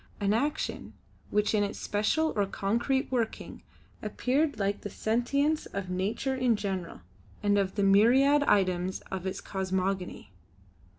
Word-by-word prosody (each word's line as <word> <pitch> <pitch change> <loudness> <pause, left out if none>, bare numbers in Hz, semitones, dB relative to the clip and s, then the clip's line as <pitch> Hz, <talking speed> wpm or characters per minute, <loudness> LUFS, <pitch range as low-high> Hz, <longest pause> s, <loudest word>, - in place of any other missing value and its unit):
An 200 0 +1
action 285 +7 -2 0.4
which 210 +1 +1
in 210 -1 +3
its 200 - -3
special 215 +10 0
or 205 -2 +1
concrete 235 +8 -1
working 235 -3 -3 0.4
appeared 285 +1 0
like 200 -1 -1
the 205 - -5
sentience 280 +9 0
of 190 -2 -5
nature 200 +8 -1
in 255 -3 +2
general, 190 -4 -4 0.4
and 205 0 +3
of 195 -2 0
the 200 - +1
myriad 250 +9 +5
items 185 -3 +1
of 190 -1 -3
its 190 - -3
cosmogony. 190 - -3
205 Hz, 135 wpm, -29 LUFS, 195-255 Hz, 0.4 s, myriad